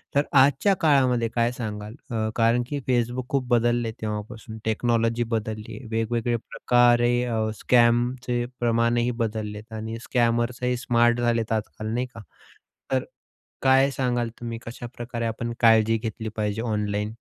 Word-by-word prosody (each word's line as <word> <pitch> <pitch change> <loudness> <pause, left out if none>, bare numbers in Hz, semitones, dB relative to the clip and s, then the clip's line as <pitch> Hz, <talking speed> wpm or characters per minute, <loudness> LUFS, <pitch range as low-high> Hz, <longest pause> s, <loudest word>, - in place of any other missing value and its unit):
तर 140 - +5
आजच्या 140 +8 +4
काळामध्ये 130 -6 +3
काय 120 0 +2
सांगाल? 105 -2 -6 0.2
अ, 110 -1 -1
कारण 115 +1 +3
की 145 -1 -2
Facebook 120 +1 0
खूप 135 -3 0
बदलले 120 -1 +2
आहे 110 +1 -8
तेव्हापासून 110 +1 -5
टेक्नॉलॉजी 115 +1 +1
बदलली 110 0 -6
आहे. 130 - -11
वेगवेगळे 115 +1 0
प्रकार 120 +1 +3
हे 120 -2 +1
स्कॅमचे 120 0 +2
प्रमाणही 120 +1 +2
बदललेत 110 0 -5
आणि 110 +1 -5
स्कॅमर्स 120 0 0
ही 125 0 +1
स्मार्ट 120 0 +2
झालेत 115 -2 0
आजकाल 110 0 -3
नाही 125 +1 0
का? 115 - -10 0.7
तर 130 -1 +1 0.6
काय 135 +1 +5
सांगाल 120 -3 -1
तुम्ही 115 -1 -5
कशाप्रकारे 120 0 -6
आपण 115 +1 -3
काळजी 115 -1 +5
घेतली 110 0 -5
पाहिजे 105 0 -1
ऑनलाईन? 105 -1 -2
120 Hz, 140 wpm, -25 LUFS, 110-120 Hz, 0.7 s, तर